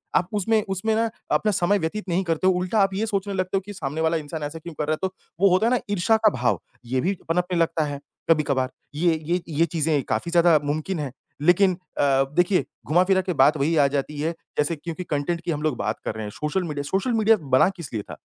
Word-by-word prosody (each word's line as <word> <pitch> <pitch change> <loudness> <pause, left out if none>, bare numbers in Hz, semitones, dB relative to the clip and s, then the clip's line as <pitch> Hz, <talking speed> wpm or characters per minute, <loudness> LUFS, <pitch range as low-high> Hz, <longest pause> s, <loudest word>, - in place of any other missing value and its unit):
आप 175 - +3
उसमें 215 +2 +2
उसमें 195 +4 0
ना 225 +1 +1 0.2
अपना 215 - +2
समय 195 +1 +2
व्यतीत 190 +4 -3
नहीं 180 +2 +1
करते 165 +1 0
हो, 190 - +5
उल्टा 180 +4 0
आप 195 -1 +3
ये 205 +3 0
सोचने 200 -2 -2
लगते 185 0 -1
हो - - -1
कि 205 - -7
सामने 155 -3 -4
वाला 160 +1 +2
इंसान 155 0 -6
ऐसा 145 +2 -5
क्यों 170 +1 -9
कर 150 0 -3
रहा 155 - +2
है? - - -2
तो 190 - -12 0.3
वो 195 +1 +5
होता 185 +5 +3
है - - +2
ना 250 - +2
ईर्ष्या 205 +3 +3
का - - +9
भाव, 125 - +2 0.3
ये 130 +2 0
भी 190 +7 +1 0.2
पनपने 180 +1 0
लगता 165 -1 +1
है 145 -1 -5 0.3
कभी-कभार, 140 -5 +2 0.3
ये 165 +1 +2
ये 175 +1 +1 0.2
ये 165 - +5
चीज़ें 160 -3 0
काफ़ी 110 +10 -1
ज़्यादा 170 -2 +5
मुमकिन 155 +5 -2
हैं। 145 -3 -3 0.3
लेकिन 180 +4 +4 0.3
अ, 135 -1 +4
देखिए 180 +2 +3 0.2
घुमा-फिरा 185 +4 +3
के 185 -1 -2
बात 145 +1 +4
वही 150 +4 +1
आ 145 - +5
जाती 145 +1 -3
है, 160 +3 0 0.3
जैसे 150 +3 +1
क्योंकि 165 +3 -6
कंटेंट 165 +2 -2
की 170 - -2
हम 150 -2 -2
लोग 155 -5 0
बात 110 - -2
कर - - -2
रहे 110 - -5
हैं, 105 - -5
सोशल 150 - -2
मीडिया 150 -4 -3
सोशल 195 - -1
मीडिया 220 0 +4 0.2
बना 130 - +5
किस 170 -6 -8
लिए 110 - -1
था? - - -9
170 Hz, 245 wpm, -24 LUFS, 150-190 Hz, 0.3 s, का